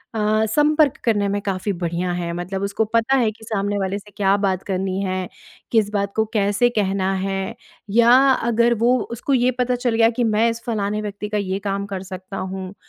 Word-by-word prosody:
अ, 215 0 +2
संपर्क 295 +4 +3
करने 205 -4 +2
में 205 +1 -1
काफ़ी 195 0 -2
बढ़िया 175 +1 -1
है 175 -1 -3
मतलब 180 +3 -4
उसको 200 +2 0
पता 230 +4 +3
है 230 -4 +2
कि 220 - -17
सामने 205 -2 -1
वाले 195 +1 -1
से 210 +1 -17
क्या 195 -1 +3
बात 190 -1 0
करनी 190 0 -2
है? 185 -1 -2 0.4
किस 220 -3 +3
बात 200 -1 -1
को 220 - +2
कैसे 205 +3 +2
कहना 195 -1 +1
है? 195 +3 -3 0.3
या 235 +3 +5 0.2
अगर 235 -1 +2
वो 250 +1 +4
उसको 245 +4 -2
ये 250 0 +3
पता 250 0 +1
चल 245 -2 -1
गया 225 0 +5
कि 240 +1 -1
मैं 220 +1 +2
इस 230 0 -4
फलाने 210 -3 -1
व्यक्ति 210 0 -5
का 210 - -1
ये 195 -1 -2
काम 200 0 -1
कर 190 -2 -5
सकता 190 +1 -8
हूँ, 190 0 -5
205 Hz, 205 wpm, -21 LUFS, 195-230 Hz, 0.4 s, या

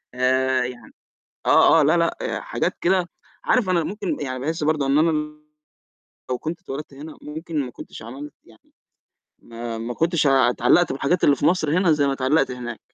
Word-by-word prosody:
آآ، 130 0 +2
يعني 125 -1 -9 0.5
آه، - - +6
آه، - - +4
لا، - - +3
لأ - - -1
حاجات - - -2
كده، 180 -1 +1 0.3
عارف 230 -7 +2
أنا 175 -3 +2
ممكن 200 +3 -3
يعني 130 -3 -4
باحس 155 +3 -3
برضه 150 -2 +1
إن 135 +1 +2
أنا 160 +2 +4 1.2
لو 125 - -1
كنت 160 +5 -5
اتولدت 145 -4 -7
هنا 150 +3 -10
ممكن 160 +1 -5
ما 125 - -8
كنتش 110 - -11
عملت 135 +5 -9
يعني - - -23 0.7
ما 115 0 -7
ما 115 +2 -4
كنتش 165 -1 +1
اتعلّقت 135 +4 +3
بالحاجات 140 +6 0
اللي 145 - +5
في - - -2
مَصر 165 -2 +2
هنا 185 -3 +3
زَي 145 -2 +2
ما 140 - +1
اتعلقت 135 +2 +1
هناك. 120 -2 -6
145 Hz, 175 wpm, -22 LUFS, 130-165 Hz, 1.2 s, آه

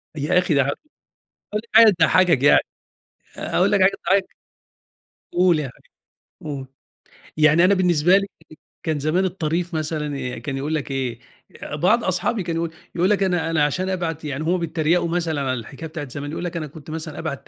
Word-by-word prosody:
يا 150 +5 +1
أخي 180 -3 0
ده 140 -1 +4
ح - - -3 0.9
هاقول 210 +1 -1
حاجة 225 -1 +9
تضحَّكك 165 -4 +4
يع 145 - +7 0.8
هاقول 195 +3 +1
لك 200 - +3
حاجة 190 - +6 0.2
تضحّكك، 195 0 +1 1.0
قُل 175 -3 +3
يا 135 -4 -3 0.7
حبيبي، 150 -3 -5
قُل. 130 - -8 0.7
يعني 155 +3 +5
أنا 200 - +5
بالنسبة 180 -1 +4
لي 200 0 -1 0.6
كان 155 -3 -1
زمان 155 +6 +1
الطريف 175 -1 -2
مثلًا 150 -5 -3
آآ - - -9
كان 135 -2 -5
يقول 150 +3 -2
لك 145 -2 -4
إيه، 125 -3 -3 0.4
آآ - - -5
بعض 200 +10 +2
أصحابي 185 +3 -1
كان 170 -1 -3
يقول 165 0 -2 0.2
يقول 180 +3 +2
لك 200 -1 +2
أنا 175 -3 0
أنا 155 -3 +2
عشان 185 +6 -1
أبعت 165 -4 -3
يعني 145 +1 -3
هم 175 +3 +1
بيتّريقوا 170 +1 0
مثلًا 165 -4 -1
على 130 -1 -1
الحكاية 130 +6 -7
بتاعة 150 -4 -6
زمان، 145 +2 -6
يقول 170 - -5
لك 175 -1 -4
أنا 155 - -4
كنت 150 +1 -13
مثلًا 155 -1 -6
أبعت 155 -4 -5
160 Hz, 185 wpm, -22 LUFS, 150-180 Hz, 1.0 s, حاجة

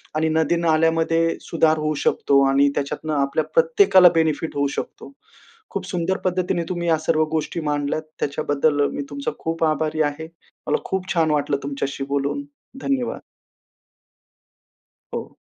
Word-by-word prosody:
आणि 160 +1 +1
नदी, 160 +1 +2
नाल्यामध्ये 165 0 +2
सुधार 160 -1 +2
होऊ 155 0 -1
शकतो 140 0 +3
आणि 140 +1 +4
त्याच्यातनं 145 +2 -3
आपल्या 140 +2 +1
प्रत्येकाला 405 - +6
बेनिफिट 160 -1 0
होऊ 140 0 +1
शकतो. - - -6 0.6
खूप - - -4
सुंदर 180 +1 -1
पद्धतीने 180 -1 0
तुम्ही 175 -1 -2
या 160 -1 +3
सर्व 155 0 +2
गोष्टी 160 +1 -2
मांडल्यात. 145 0 -1 0.2
त्याच्याबद्दल 145 0 0
मी - - -3
तुमचा 140 -1 -3
खूप 165 0 -2
आभारी 155 0 0
आहे. 160 +2 -8 0.4
मला - - +2
खूप 190 -1 -2
छान 160 -3 +2
वाटलं 145 -1 +1
तुमच्याशी 140 0 -3
बोलून, 140 - -1 0.4
धन्यवाद. 265 -3 -1 1.9
हो. - - -6
155 Hz, 135 wpm, -22 LUFS, 145-170 Hz, 1.9 s, प्रत्येकाला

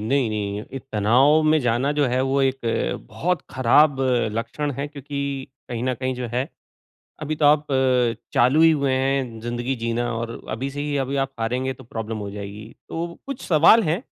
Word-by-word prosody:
नहीं-नहीं, 110 -4 -1
ये 135 - -4
तनाव 130 +9 +4
में 155 0 +4
जाना 125 +3 +1
जो 145 -2 +2
है 130 +1 +1
वो 135 +1 +1
एक 135 0 +1 0.5
बहुत 180 +1 -1
ख़राब 135 +3 +4 0.3
लक्षण 120 +6 -3
है 140 - -2
क्योंकि 140 -1 -5 0.2
कहीं 120 -1 -4
न 130 - +1
कहीं 130 +2 -2
जो 125 -1 -4
है 125 +3 -1 0.7
अभी 155 +1 -2
तो 150 - 0
अ, - - +8
आप 150 0 +3 0.7
चालू 130 +6 +4
ही 165 - +7
हुए 140 -3 +1
हैं 130 -3 0
ज़िंदगी 120 +3 -2
जीना 115 +1 -1
और 115 0 -3 0.2
अभी 130 +6 -3
से 145 +1 -6
ही 145 -1 -2
अभी 135 +1 -1
आप 135 - -10
हारेंगे 125 +3 -1
तो 130 - -14
प्रॉब्लम 110 -1 -5
हो 100 -1 -5
जाएगी। 105 +2 -8 0.2
तो 170 +1 -4
कुछ 275 -2 -5
सवाल 170 +8 +6
है 160 +1 +1
अ, - - -13
130 Hz, 190 wpm, -23 LUFS, 115-145 Hz, 0.7 s, अ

